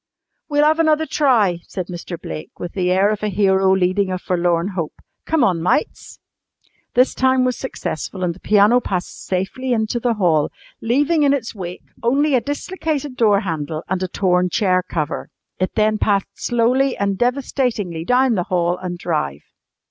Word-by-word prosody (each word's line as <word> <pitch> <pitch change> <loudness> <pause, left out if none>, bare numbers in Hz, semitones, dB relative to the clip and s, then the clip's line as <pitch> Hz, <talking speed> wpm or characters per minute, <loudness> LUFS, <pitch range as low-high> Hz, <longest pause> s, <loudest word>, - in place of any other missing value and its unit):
"We'll 295 0 +3
'ave 315 +2 +3
another 315 -1 +2
try," 230 - +2
said 185 - -4
Mr. 175 -1 -7
Blake 75 -1 -8
with 175 - -6
the 180 -2 0
air 190 +3 +3
of 215 - -3
a 215 - -1
hero 190 -1 +3
leading 190 +1 +1
a 185 - -1
forlorn 175 0 0
hope. 170 -6 -4 0.3
"Come 320 -4 +2
on, 180 -8 +2
mites." 180 - -1 0.8
This 250 +2 +4
time 260 0 +2
was 250 -1 0
successful 190 -7 -5
and 175 -1 0
the 180 - -16
piano 210 +5 +4
passed 185 -6 -4
safely 195 +8 -1
into 220 +1 0
the 235 -1 0
hall, 165 -7 +2 0.3
leaving 290 +7 +2
in 285 -1 +4
its 255 -5 -2
wake 180 -4 -7 0.2
only 280 +5 +2
a 255 - +3
dislocated 290 -1 -3
door 210 -4 +3
handle 160 -4 -4
and 185 0 -2
a 185 - -1
torn 180 -1 +1
chair 185 -2 +2
cover. 160 -4 -4 0.3
It 185 - -1
then 215 0 +2
passed 200 -2 +1
slowly 250 +3 +1
and 200 -1 0
devastatingly 245 - -1
down 250 +5 +3
the 180 -5 -1
hall 175 -1 +1
and 180 -1 -5
drive. 150 - -2
200 Hz, 170 wpm, -20 LUFS, 180-250 Hz, 0.8 s, This